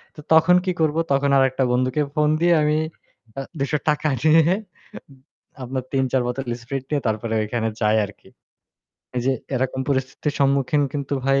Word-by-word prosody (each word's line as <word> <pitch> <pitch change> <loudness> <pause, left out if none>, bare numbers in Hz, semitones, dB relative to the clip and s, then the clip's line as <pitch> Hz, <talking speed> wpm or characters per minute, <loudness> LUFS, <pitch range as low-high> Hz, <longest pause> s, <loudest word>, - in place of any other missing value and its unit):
তো - - -13
তখন 165 +3 +6
কি 185 - +1
করব? 155 -1 +2 0.2
তখন 140 +1 +2
আরেকটা 135 0 +2
বন্ধুকে 130 +4 +1
ফোন 150 0 +3
দিয়ে 175 0 +4
আমি 150 0 +2 0.6
আ - - -2 0.2
৳২০০ 150 +2 0 0.2
নিয়ে 160 +1 +6 1.2
আপনার 130 +1 -4
৩ 135 -1 +2
৪ 130 - +2
বোতল 125 +1 -4 0.2
স্প্রিট 135 +2 -4
নিয়ে 145 -2 0
তারপরে 110 +1 -2
ঐখানে 115 +1 -2
যাই 105 +1 +3
আরকি। 100 - -15 0.9
এইযে 130 +2 +1 0.2
এরকম 130 +1 -1
পরিস্থিতির 135 +2 -1
সম্মুখীন 140 +1 +2
কিন্তু 140 -1 -3
ভাই 135 0 +3
135 Hz, 155 wpm, -22 LUFS, 130-150 Hz, 1.2 s, তখন